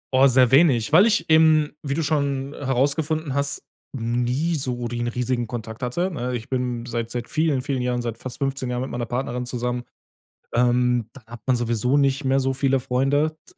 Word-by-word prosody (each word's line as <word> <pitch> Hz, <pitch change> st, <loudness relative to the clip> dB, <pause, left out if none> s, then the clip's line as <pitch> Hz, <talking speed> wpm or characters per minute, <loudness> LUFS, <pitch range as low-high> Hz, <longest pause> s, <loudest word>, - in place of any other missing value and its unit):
Oh, 135 Hz, +1 st, +6 dB
sehr 125 Hz, -2 st, +4 dB
wenig, 135 Hz, -5 st, +4 dB
weil 185 Hz, +7 st, +7 dB
ich 205 Hz, -7 st, +1 dB
eben- 155 Hz, -1 st, +5 dB
wie 140 Hz, -2 st, -3 dB
du 165 Hz, -, -1 dB
schon 140 Hz, -2 st, -1 dB
herausgefunden 145 Hz, +3 st, -1 dB
hast- 140 Hz, 0 st, -2 dB, 0.3 s
nie 125 Hz, +7 st, 0 dB
so 125 Hz, -5 st, -2 dB
den 120 Hz, 0 st, -3 dB
riesigen 120 Hz, 0 st, -1 dB
Kontakt 110 Hz, -1 st, -7 dB
hatte, 170 Hz, +10 st, -1 dB
ne? 125 Hz, -6 st, -3 dB
Ich 115 Hz, -1 st, -6 dB
bin 125 Hz, -2 st, -2 dB
seit 115 Hz, -1 st, -3 dB
seit 120 Hz, -1 st, -5 dB
vielen, 155 Hz, -4 st, 0 dB
vielen 135 Hz, -2 st, -2 dB
Jahren 125 Hz, -1 st, -1 dB
seit 115 Hz, -2 st, -4 dB
fast 130 Hz, -2 st, -7 dB
15 135 Hz, -2 st, -2 dB
Jahren 125 Hz, 0 st, -2 dB
mit 130 Hz, -, -6 dB
meiner 120 Hz, -1 st, -3 dB
Partnerin 125 Hz, 0 st, -3 dB
zusammen. 125 Hz, 0 st, -3 dB, 0.7 s
Ähm, 125 Hz, -1 st, +2 dB
da 140 Hz, -, -13 dB
hat 115 Hz, -1 st, -10 dB
man 130 Hz, -, +3 dB
sowieso 120 Hz, +2 st, 0 dB
nicht 140 Hz, 0 st, +2 dB
mehr 135 Hz, +1 st, +3 dB
so 135 Hz, 0 st, 0 dB
viele 135 Hz, 0 st, +2 dB
Freunde. 140 Hz, +5 st, 0 dB, 0.2 s
S -, -, -57 dB
130 Hz, 195 wpm, -23 LUFS, 120-140 Hz, 0.7 s, weil